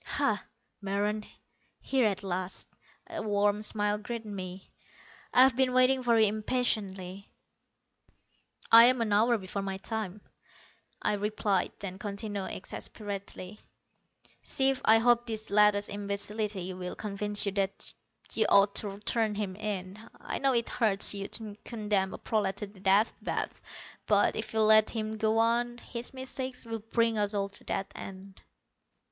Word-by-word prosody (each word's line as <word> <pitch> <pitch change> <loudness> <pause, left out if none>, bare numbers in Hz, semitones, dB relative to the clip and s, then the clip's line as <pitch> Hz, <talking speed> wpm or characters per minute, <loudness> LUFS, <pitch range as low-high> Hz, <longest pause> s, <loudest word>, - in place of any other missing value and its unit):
"Ha, - - 0 0.4
Meron, 205 +2 -1 0.6
here 260 -4 +1
at 200 -1 -2
last." 185 -1 -3 0.4
A 335 -2 -5
warm 205 0 +1
smile 210 -1 0
greeted 230 +1 -6
me. 185 -2 -7 0.6
"I've 260 0 +6
been 260 0 +2
waiting 255 +1 +4
for 235 -2 +3
you 220 - +6
impatiently." 200 -4 -1 1.4
"I'm 240 +2 +8
an 215 -3 0
hour 230 +3 +4
before 195 0 -5
my 195 -1 -4
time," 210 -1 -5 0.8
I - - +2
replied, 205 -1 0
then 190 -1 -6
continued, 200 -1 -4
exasperatedly: 200 0 -7 0.8
"Chief, 270 -1 +1
I 220 - +6
hope 240 +1 +3
this 220 -2 -4
latest 205 0 +4
imbecility 200 -1 -3
will 180 0 -6
convince 205 0 +3
you 200 - 0
that 195 0 -3 0.4
you 220 - +2
ought 200 0 +5
to 200 -2 +1
turn 220 -1 0
him 200 -3 -3
in. 200 -2 -4 0.2
I - - -4
know 270 -1 +2
it 235 -1 +1
hurts 210 -4 +2
you 200 -1 -4
to 215 -2 -5
condemn 210 -4 -1
a - - -8
prolat 205 -3 -1
to 210 - -4
the 200 -1 -16
Death 195 +3 +3
Bath, - - -3 0.5
but 205 -1 +3
if 220 0 -4
you 220 - +1
let 215 0 +6
him 215 -2 -3
go 220 0 0
on, 240 +1 +1
his 240 0 -5
mistakes 260 -1 -5
will 225 -1 -4
bring 225 0 0
us 205 0 0
all 200 0 -1
to 200 - -7
that 195 - -3
end." 195 0 -10
210 Hz, 150 wpm, -29 LUFS, 200-225 Hz, 1.4 s, I'm